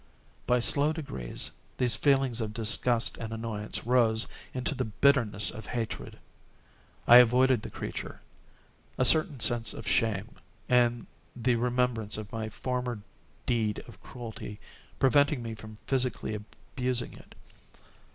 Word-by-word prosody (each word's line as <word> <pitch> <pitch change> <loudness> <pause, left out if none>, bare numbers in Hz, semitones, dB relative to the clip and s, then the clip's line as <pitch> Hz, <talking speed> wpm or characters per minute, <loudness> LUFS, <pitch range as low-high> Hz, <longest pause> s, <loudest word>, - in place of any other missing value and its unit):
By 125 - +4
slow 145 +5 +3
degrees, 65 - -5 0.3
these 125 -3 +3
feelings 135 -1 +2
of 110 -1 -4
disgust 115 +1 +2
and 115 -1 -5
annoyance 110 -2 -4
rose 115 -2 +3 0.2
into 130 +3 -2
the 130 -2 -2
bitterness 110 -2 +3
of 110 - -9
hatred. 115 -2 -4 0.9
I 120 - +10
avoided 125 0 +5
the - - -7
creature; - - -6 0.8
a 130 - +2
certain 155 -2 +4
sense 120 -1 0
of - - -8
shame, 110 -1 0 0.3
and 120 -1 +2 0.3
the 125 0 +1
remembrance 120 -3 0
of 105 -2 -7
my 110 -1 -4
former 125 -1 -3 0.4
deed 110 -4 0
of - - -14
cruelty, 110 -3 -8 0.4
preventing 140 -1 +3
me 115 -1 -5
from 110 0 -11
physically 130 -4 -1
abusing 125 +4 -4
it. - - -15
120 Hz, 130 wpm, -29 LUFS, 110-125 Hz, 0.9 s, I